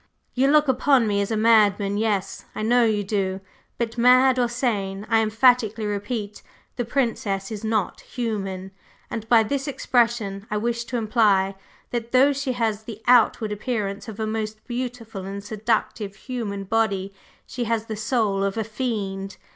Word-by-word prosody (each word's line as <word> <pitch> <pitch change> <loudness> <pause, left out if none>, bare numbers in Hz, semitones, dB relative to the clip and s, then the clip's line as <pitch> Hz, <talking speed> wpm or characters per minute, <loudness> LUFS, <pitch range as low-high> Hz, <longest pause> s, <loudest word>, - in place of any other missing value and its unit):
You 265 +2 +2
look 300 +1 +4
upon 265 -1 +3
me 200 -1 +1
as 200 - -2
a 220 - 0
madman 210 -3 +4
yes! 205 -3 -1
I - - -3
know 240 +2 +4
you 215 -2 +1
do! 195 -2 -1 0.4
But 235 0 -3
mad 255 +1 +5
or 245 - +3
sane, 205 -5 -2
I 225 0 +5
emphatically 225 0 +3
repeat, 205 +1 -4 0.3
the 245 - -2
Princess 225 -6 -1
is 215 -1 -6
not 220 -3 -1
human, 195 -6 -4 0.4
and 225 -1 -5
by 230 -2 +6
this 275 +5 -2
expression 230 -7 0
I 210 - -1
wish 235 +2 -1
to 245 +1 -3
imply 210 -4 +2 0.4
that 235 0 -4
though 270 +3 +5
she 275 -1 -2
has 225 -3 -1
the 220 -2 -8
outward 230 -3 +4
appearance 210 -2 -3
of 220 -1 -8
a 220 - 0
most 215 0 -4
beautiful 240 -5 -5
and 200 +1 -6
seductive 215 -1 -2
human 220 -6 -5
body, 195 -2 0 0.3
she 245 -2 -4
has 225 -1 -1
the 220 - -5
soul 210 -3 0
of 200 +2 -1
a 220 - 0
fiend. 205 -4 -4
220 Hz, 165 wpm, -24 LUFS, 200-240 Hz, 0.4 s, by